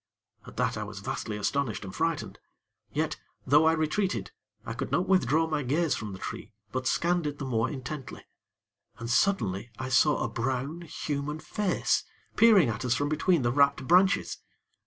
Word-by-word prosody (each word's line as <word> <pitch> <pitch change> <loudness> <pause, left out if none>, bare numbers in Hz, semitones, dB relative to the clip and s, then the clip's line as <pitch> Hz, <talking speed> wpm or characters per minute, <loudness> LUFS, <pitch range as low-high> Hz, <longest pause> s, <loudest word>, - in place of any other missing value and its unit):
At - - -12
that - - 0
I 105 - -3
was 105 -1 -8
vastly 105 +1 -4
astonished 105 0 -1
and 95 - -8
frightened; - - -2 0.5
yet, - - -1 0.3
though 145 +4 +5
I 160 - +5
retreated, 155 - -1 0.3
I 115 - -4
could 130 +3 -4
not 180 - +1
withdraw 165 -4 +3
my 155 -2 -1
gaze 150 +5 +1
from 105 -2 -4
the 95 - -7
tree; 100 - -7 0.2
but 130 0 -2
scanned 175 +1 +1
it 145 0 -4
the 145 - -5
more 115 -2 0
intently; 135 0 -7 0.7
and, 115 +1 -5
suddenly, 120 - +1
I 130 +1 -4
saw 145 +3 +3
a - - 0
brown, 135 +7 -3
human 150 -2 -4
face 190 +4 0 0.3
peering 215 - +6
at 115 +1 -3
us 125 -1 +1
from 145 +2 -1
between 155 0 +2
the 120 - +2
wrapped 140 -1 +2
branches. 185 +3 +3
140 Hz, 175 wpm, -28 LUFS, 120-160 Hz, 0.7 s, peering